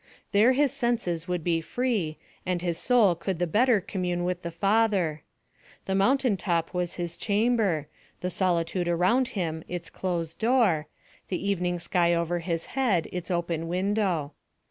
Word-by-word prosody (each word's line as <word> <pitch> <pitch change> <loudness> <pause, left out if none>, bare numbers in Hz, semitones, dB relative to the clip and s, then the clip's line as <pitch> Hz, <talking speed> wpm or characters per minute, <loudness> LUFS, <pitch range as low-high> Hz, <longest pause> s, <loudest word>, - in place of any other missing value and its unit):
There 220 +5 +5
his 280 0 +2
senses 220 -9 -1
would 180 -2 -2
be 165 -1 +1
free, 200 -5 -1 0.3
and 180 -1 -2
his 170 -2 -1
soul 230 -6 +4
could 175 +2 -3
the 175 - +1
better 225 +6 +3
commune 180 -2 -2
with 180 0 -2
the 170 - -4
Father. 195 -3 +1 0.6
The 190 - -1
mountain 245 +3 +3
top 170 -3 -1
was 180 -1 -2
his 170 -1 -4
chamber, 205 -8 +1 0.3
the 180 - -2
solitude 175 -1 0
around 185 +10 +2
him 160 -3 -2
its 175 -2 -6
closed 170 -3 -3
door, 220 -10 +2 0.4
the 190 +1 -3
evening 180 -3 0
sky 170 0 +2
over 170 +1 0
his 165 -1 -2
head 230 -11 +1
its 180 -2 -5
open 170 -2 -1
window. 185 -4 0
180 Hz, 155 wpm, -27 LUFS, 170-205 Hz, 0.6 s, There